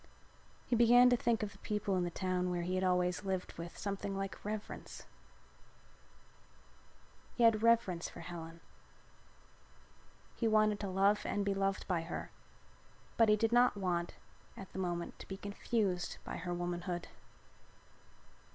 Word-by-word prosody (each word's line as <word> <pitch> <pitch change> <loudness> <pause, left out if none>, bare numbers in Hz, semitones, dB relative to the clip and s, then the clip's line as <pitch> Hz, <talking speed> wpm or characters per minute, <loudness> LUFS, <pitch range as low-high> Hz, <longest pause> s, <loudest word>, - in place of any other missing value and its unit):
He 245 - +1
began 245 +2 +7
to - - +6
think 235 -2 +1
of 205 - -3
the 200 - -16
people 210 -2 -1
in 180 - +1
the 175 - -1
town 180 0 -1
where 175 -1 -1
he 180 +2 -2
had 185 0 0
always 180 0 +1
lived 190 -2 -3
with 170 +1 -7
something 200 0 -3
like 195 0 -5
reverence. 210 0 -6 2.3
He 240 - +1
had 225 -2 +5
reverence 225 -7 +3
for - - -10
Helen. 165 -1 -8 1.7
He 230 - 0
wanted 215 -1 +3
to 205 - -3
love 195 +2 +3
and 205 -1 -1
to 200 - +1
be - - +2
loved 195 0 -1
by 180 -3 +1
her, 165 +1 -6 0.8
but 225 -2 +5
he 210 - +6
did 225 +1 +1
not 245 -2 +4
want 175 -3 -1 0.4
at 195 - -10
the - - -5
moment 175 -2 -3
to - - -10
be 190 - -6
confused 200 -2 -1
by - - -5
her 175 +1 -4
womanhood. 175 0 -3
195 Hz, 155 wpm, -34 LUFS, 180-215 Hz, 2.3 s, began